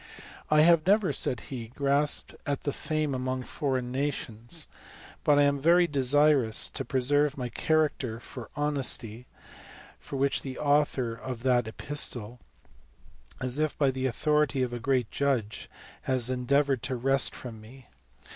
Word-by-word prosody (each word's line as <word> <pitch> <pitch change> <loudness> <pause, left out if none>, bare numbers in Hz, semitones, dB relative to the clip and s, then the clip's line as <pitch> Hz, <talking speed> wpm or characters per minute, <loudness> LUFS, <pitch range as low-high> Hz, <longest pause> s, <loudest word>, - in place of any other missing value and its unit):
"I 155 0 +5
have 170 0 +4
never," 200 -6 +3
said 125 -2 -1
he, 120 -4 -7
"grasped 140 +1 0
at 140 -1 -2
fame 155 -2 -2
among 130 0 -3
foreign 130 -3 -3
nations, 135 +1 -1 0.6
but 145 - +4
I 145 - +5
am 140 0 +2
very 170 +4 +4
desirous 140 -4 +4
to - - -4
preserve 145 +2 +1
my 125 -2 -4
cha 160 - -2
racter 140 -7 0
for 120 0 -9
honesty, 130 -5 -1 0.8
which 140 0 0
the 130 -2 -7
author 145 -5 +1
of 125 0 -7
that 125 -3 +2
epistle, 120 -2 -2 1.0
as 130 +3 -3
if 155 -1 -1
by 140 -3 +2
the 130 0 -2
authority 150 +1 +1
of 125 -1 -3
a 120 - -4
great 125 -2 0
judge, 130 -7 -2 0.3
had 130 -3 0
endeavoured 135 +1 +1
to 130 - -3
wrest 135 +2 +2
from 115 -4 -9
me. 125 +4 -15
135 Hz, 145 wpm, -28 LUFS, 125-145 Hz, 1.0 s, I